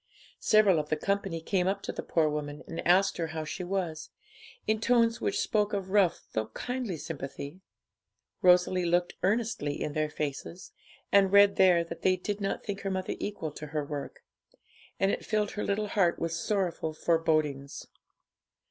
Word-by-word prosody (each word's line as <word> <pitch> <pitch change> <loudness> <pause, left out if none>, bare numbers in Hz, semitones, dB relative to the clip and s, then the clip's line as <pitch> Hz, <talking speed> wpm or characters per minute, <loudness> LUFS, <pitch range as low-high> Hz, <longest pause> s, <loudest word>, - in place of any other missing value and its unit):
Several 205 -6 +4
of 150 0 -4
the 155 - +2
company 195 -1 -1
came 180 +2 0
up 200 +1 -1
to - - -3
the - - -5
poor 160 -2 +1
woman, 150 0 -4
and 165 +1 -5
asked 190 +2 +4
her 165 -2 -1
how 160 0 -4
she 165 - -5
was, 175 -4 -3 0.6
in 215 0 0
tones 230 -1 +3
which 410 +1 0
spoke 210 - +1
of 190 -2 -3
rough 190 -4 +2
though 110 0 -1
kindly 245 -8 -3
sympathy. 145 +2 -7 0.8
Rosalie 180 0 +4
looked 175 +1 +1
earnestly 200 -8 0
in 150 - -3
their 155 0 0
faces, 150 +4 -5 0.4
and 195 -1 +5
read 200 0 +6
there 180 -3 +5
that 170 0 -8
they 185 0 +3
did 205 +3 -4
not 195 - -2
think 200 -1 -4
her 195 - -2
mother 185 -1 -2
equal 200 -7 -4
to 150 +1 -8
her 150 -1 -3
work; 145 -1 -6 0.8
and 195 +1 +3
it - - -3
filled 210 -1 0
her 210 - -4
little 205 +1 -1
heart 180 -5 +2
with 165 - -2
sorrowful 170 -2 -1
forebodings. 155 -4 0
180 Hz, 175 wpm, -29 LUFS, 155-200 Hz, 0.8 s, read